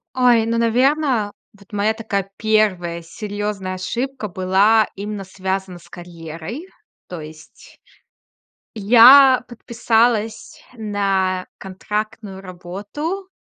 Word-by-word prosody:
Ой, 245 -3 +4
ну, 230 0 -1
наверно, 245 -1 +1 0.3
вот 200 +2 -21
моя 210 +2 0
такая 200 -4 -3
1 190 -6 0
серьёзная 205 +1 -5
ошибка 235 +6 -4
была 195 +4 +2
именно 205 0 -5
связана 190 -1 -4
с 170 - -19
карьерой. 170 - -9 0.4
То 175 -3 -7
есть 155 +1 -14 1.0
я 245 +5 +7
подписалась 230 -2 -1
на 195 -4 -1
контрактную 210 +1 -5
работу 205 - -6
205 Hz, 95 wpm, -20 LUFS, 185-230 Hz, 1.0 s, я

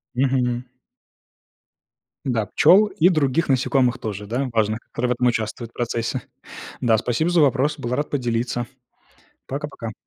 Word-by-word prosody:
Мгм. 125 -2 +1 1.6
Да, 115 -5 0
пчёл 195 - +5
и 180 -2 +3
других 155 -1 +1
насекомых 130 -1 +2
тоже, 105 -1 -5
да, 125 +5 -2
важно, 110 0 +1
которые 125 +1 -3
в - - +3
этом 125 +1 +1
участвуют 115 0 -2
в - - -45
процессе. 115 -1 -2 0.6
Да, 115 -2 +3
спасибо 125 +10 0
за 175 -2 +3
вопрос, 145 +2 +2
был 120 -3 -5
рад 145 +2 -2
поделиться. 120 -2 -1 0.8
Пока 145 +2 -4
пока. 115 -6 -7
125 Hz, 145 wpm, -22 LUFS, 115-140 Hz, 1.6 s, пчёл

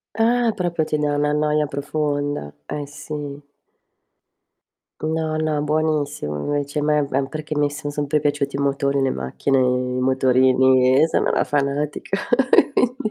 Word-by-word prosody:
Ah, 235 +1 +2
proprio 175 -4 -1
ti 155 - -1
dà 150 -1 0
una 150 0 +1
noia 150 0 +1
profonda. 145 - -2
Eh 145 - -5
sì. 145 0 -7 1.6
No, 160 0 -1
no, 155 -1 0
buonissimo 150 - -1
invece, 145 0 -2
a - - -1
me 150 -1 +2
ehm, 135 +1 0
perché 155 +2 -5
mi 145 0 +2
son 145 0 -6
sempre 145 +1 0
piaciuti 145 -1 -1
i - - -3
motori, 140 0 0
le 135 -1 +1
macchine, 65 - -1
i 125 0 0
motorini 130 0 +4
e - - +4
sono - - +1
una - - +2
fanatica, 145 +5 -1 0.6
quindi 250 -1 +1
145 Hz, 145 wpm, -21 LUFS, 140-150 Hz, 1.6 s, motorini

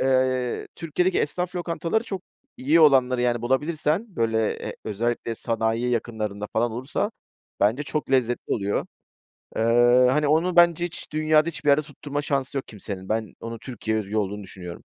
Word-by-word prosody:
Eee, 130 -1 +1
Türkiye'deki 175 +2 0
esnaf 180 +4 -2
lokantaları 175 +5 -1
çok 190 -2 -5 0.3
iyi 155 +6 +3
olanları, 130 -4 +5
yani, 120 -1 +1
bulabilirsen, 155 - 0
böyle, 110 -1 +1 0.2
e, - - -5
özellikle 115 +2 -2
sanayi 115 +1 -1
yakınlarında 110 -3 -2
falan 115 +1 +1
olursa 135 - -2 0.5
bence 115 +8 +3
çok 150 -1 -3
lezzetli 120 -2 +1
oluyor. 100 -2 -1 0.7
Eee, - - +1 0.5
hani, 150 +1 +2
onu 170 +4 +2
bence 175 0 +5
hiç 170 - -7
dünyada 155 +1 +3
hiçbir 150 -2 -2
yere 145 +2 +5
tutturma 145 0 -5
şansı 140 -2 -1
yok 130 - -4
kimsenin, 100 -3 -7
ben 110 -2 -1
onu 115 0 -6
Türkiye'ye 110 -3 -2
özgü 100 +3 -6
olduğunu 105 0 -2
düşünüyorum. 90 -2 -9
130 Hz, 150 wpm, -25 LUFS, 110-155 Hz, 0.7 s, olanları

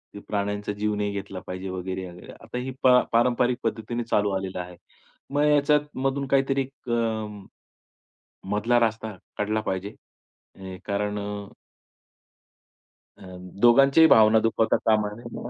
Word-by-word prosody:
ते - - -7
प्राण्यांचा 105 0 -2
जीव 105 0 0
नाही 105 0 -1
घेतला 100 -1 -6
पाहिजे 95 +1 -5
वगैरे-वगैरे. 95 -1 -6
आता - - -9
ही 130 +1 -4
पा 125 -1 +7
पारंपरिक 120 +1 +2
पद्धतीने 115 +2 -2
चालू 105 -3 +1
आलेलं 95 -1 -3
आहे. 90 0 -7 0.6
मग 145 - +2
ह्याच्यामधून 145 -2 +1
काहीतरी 135 0 +2 0.2
अ, 115 -2 -1 1.3
मधला 115 +4 +2
रास्ता 110 -1 -1 0.2
काढला 105 +1 -1
पाहिजे. 95 0 -4 0.6
अ, 95 -1 -8
कारण 105 0 -2
अ 100 0 -5 1.7
अ, - - -20 0.4
दोघांच्याही 135 +6 +6
भावना 110 0 +6
दुखवता 115 0 +1
कामा 105 -2 +3
नये. 120 +1 -8
110 Hz, 125 wpm, -25 LUFS, 100-120 Hz, 1.7 s, पा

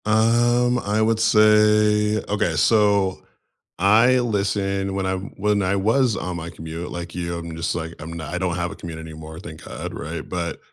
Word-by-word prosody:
Um, 120 +3 +3
I 105 0 -1
would 110 0 +2
say, 105 -1 +4
okay, 100 -5 0
so, 100 +2 +3 0.6
I 115 +6 +5
listen 100 -3 -1
when 95 -1 -1
I'm 95 +1 -3
when 105 +1 +1
I 95 +2 +1
was 110 +4 +2
on 90 -1 -4
my 85 0 -6
commute, 80 +1 -7
like 85 -1 -6
you, 85 -1 -3
I'm 85 -1 -7
just, 80 - -1
like, 80 -1 -4
I'm 80 +2 -7
not 80 -2 -6
I - - -1
don't 90 -2 -1
have 90 0 -2
a - - -8
commute 80 -2 -8
anymore, 80 0 -9
thank - - -10
God, - - -6
right, 80 0 -6
but, 85 -2 -4
95 Hz, 185 wpm, -22 LUFS, 85-105 Hz, 0.6 s, I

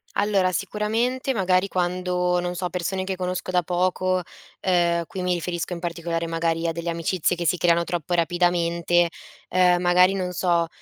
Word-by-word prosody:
Allora, 200 -3 +2
sicuramente, 220 - -1
magari 185 -3 +2
quando, 180 -1 0
non 175 0 -2
so, 180 0 -3
persone 185 +1 -2
che 190 0 -3
conosco 185 0 -3
da 180 -1 +2
poco, 185 +1 0 0.4
uhm, 170 -2 +2
qui 185 -1 -5
mi 180 - +1
riferisco, 175 0 -3
in 170 - -5
particolare, 170 -1 -3
magari, 165 0 -1
a - - +1
delle 170 +1 -3
amicizie 170 +1 0
che 170 -1 -2
si 180 - +2
creano 170 0 +3
troppo 175 -1 -3
rapidamente, 175 0 +2 0.4
uhm, 180 -1 +4
magari 180 +1 +4
non 185 -2 -2
so, 170 -2 +1
180 Hz, 165 wpm, -24 LUFS, 170-185 Hz, 0.4 s, uhm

